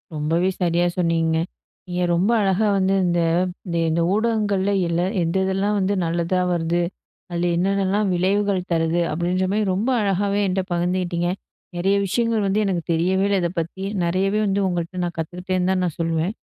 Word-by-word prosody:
ரொம்பவே 165 Hz, +5 st, +1 dB
சரியா 175 Hz, 0 st, +2 dB
சொன்னீங்க. 165 Hz, -2 st, +1 dB, 0.5 s
நீங்க 180 Hz, 0 st, -2 dB
ரொம்ப 190 Hz, +6 st, +2 dB
அழகா 195 Hz, +2 st, +2 dB
வந்து 195 Hz, 0 st, +2 dB
இந்த 175 Hz, -1 st, +1 dB, 0.5 s
இந்த 170 Hz, -2 st, -2 dB
இந்த 165 Hz, +1 st, +1 dB
ஊடகங்கள்ல 210 Hz, -3 st, +1 dB, 0.2 s
இல்ல, 170 Hz, +1 st, 0 dB, 0.2 s
எந்த 165 Hz, +2 st, -1 dB
இதெல்லாம் 195 Hz, +2 st, 0 dB
வந்து 195 Hz, +1 st, +1 dB
நல்லதா 170 Hz, +2 st, 0 dB
வருது. 170 Hz, 0 st, 0 dB, 0.5 s
அதுல 175 Hz, 0 st, 0 dB
என்னென்னலாம் 195 Hz, +2 st, +1 dB
விளைவுகள் 195 Hz, +2 st, +1 dB
தருது 165 Hz, +1 st, +1 dB
அப்படின்ற 175 Hz, +3 st, 0 dB
மாதிரி 210 Hz, +1 st, +1 dB
ரொம்ப 215 Hz, +7 st, 0 dB
அழகாகவே 200 Hz, 0 st, 0 dB
என்கிட்ட 190 Hz, +1 st, 0 dB
பகிர்ந்துகிட்டிங்க. 175 Hz, 0 st, 0 dB, 0.5 s
நெறைய 195 Hz, +3 st, +2 dB
விஷயங்கள் 225 Hz, +1 st, 0 dB
வந்து 200 Hz, +2 st, +1 dB
எனக்கு 180 Hz, -4 st, -1 dB
தெரியவே 185 Hz, +4 st, +2 dB
இல்ல 200 Hz, -1 st, +2 dB
இத 170 Hz, -, 0 dB
பத்தி. 170 Hz, +4 st, -5 dB, 0.2 s
நிறையவே 190 Hz, +4 st, +1 dB
வந்து 200 Hz, +1 st, +1 dB
உங்கள்ட்ட 175 Hz, +1 st, -3 dB
நான் 175 Hz, -1 st, -3 dB
கத்துக்கிட்டேன்னு 180 Hz, +2 st, -2 dB
தான் 185 Hz, -, +1 dB
நான் 165 Hz, -, -4 dB
சொல்லுவேன். 165 Hz, +4 st, 0 dB
185 Hz, 155 wpm, -22 LUFS, 170-195 Hz, 0.5 s, சரியா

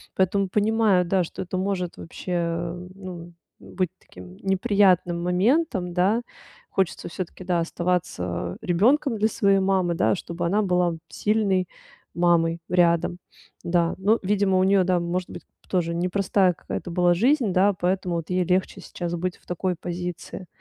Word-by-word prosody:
Поэтому 190 Hz, +1 st, +1 dB
понимаю, 210 Hz, -2 st, +3 dB
да, 185 Hz, +1 st, +2 dB
что -, -, -8 dB
это 185 Hz, +1 st, -4 dB
может 185 Hz, -2 st, -2 dB
вообще, 180 Hz, +2 st, -8 dB
э, 170 Hz, +1 st, -2 dB
ну, 175 Hz, -3 st, -9 dB, 0.3 s
быть 185 Hz, -2 st, -3 dB
таким 90 Hz, 0 st, -13 dB
неприятным 190 Hz, -3 st, +2 dB
моментом, 185 Hz, -, +1 dB
да. 195 Hz, +6 st, +2 dB, 0.5 s
Хочется 190 Hz, -3 st, -1 dB
всё-таки, 185 Hz, +1 st, -7 dB
да, 175 Hz, -2 st, +1 dB
оставаться 165 Hz, -, -2 dB
ребёнком 230 Hz, -, +2 dB
для 215 Hz, +1 st, +2 dB
своей 195 Hz, -2 st, +3 dB
мамы, 190 Hz, -2 st, +1 dB
да, -, -, +2 dB
чтобы 170 Hz, -1 st, -5 dB
она 200 Hz, +5 st, +2 dB
была 180 Hz, -3 st, +1 dB
сильной 200 Hz, -4 st, +1 dB, 0.5 s
мамой 170 Hz, -1 st, +2 dB
рядом, 175 Hz, -1 st, +2 dB, 0.5 s
да. 170 Hz, -1 st, +1 dB
Но, 210 Hz, +4 st, +2 dB
видимо, 195 Hz, -1 st, +2 dB
у -, -, +4 dB
неё, 195 Hz, -1 st, +4 dB
да, 180 Hz, -1 st, +2 dB
может 175 Hz, +1 st, -3 dB
быть, -, -, -9 dB, 0.3 s
тоже 170 Hz, -3 st, 0 dB
непростая 185 Hz, +1 st, +2 dB
какая-то 175 Hz, -, -6 dB
была 175 Hz, 0 st, +3 dB
жизнь, 240 Hz, -, +2 dB
да, 195 Hz, +2 st, +4 dB
поэтому 180 Hz, -1 st, -1 dB
вот 165 Hz, -2 st, -4 dB
ей 180 Hz, 0 st, +1 dB
легче 185 Hz, +2 st, 0 dB
сейчас 175 Hz, -1 st, -5 dB
быть 180 Hz, +1 st, -3 dB
в -, -, -30 dB
такой 180 Hz, +1 st, -2 dB
позиции. 175 Hz, +1 st, -6 dB
180 Hz, 150 wpm, -24 LUFS, 175-195 Hz, 0.5 s, у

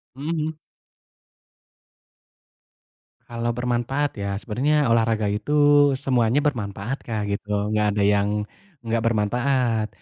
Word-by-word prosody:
Mhm 145 Hz, +4 st, -6 dB
mhm. 155 Hz, 0 st, -2 dB, 2.7 s
Kalau 120 Hz, 0 st, -3 dB
bermanfaat 125 Hz, +2 st, -1 dB
ya 100 Hz, 0 st, -2 dB
sebenarnya 135 Hz, +7 st, 0 dB
olahraga 115 Hz, -2 st, +2 dB
itu 145 Hz, +5 st, +4 dB
semuanya 130 Hz, 0 st, +1 dB
bermanfaat, 115 Hz, -2 st, -2 dB
Kak, 110 Hz, -3 st, -2 dB
gitu, 105 Hz, +1 st, -2 dB
nggak 105 Hz, -1 st, +1 dB
ada 100 Hz, -, +1 dB
yang 105 Hz, +1 st, +2 dB, 0.4 s
nggak 115 Hz, 0 st, 0 dB
bermanfaat. 115 Hz, +1 st, +1 dB
115 Hz, 100 wpm, -23 LUFS, 105-135 Hz, 2.7 s, itu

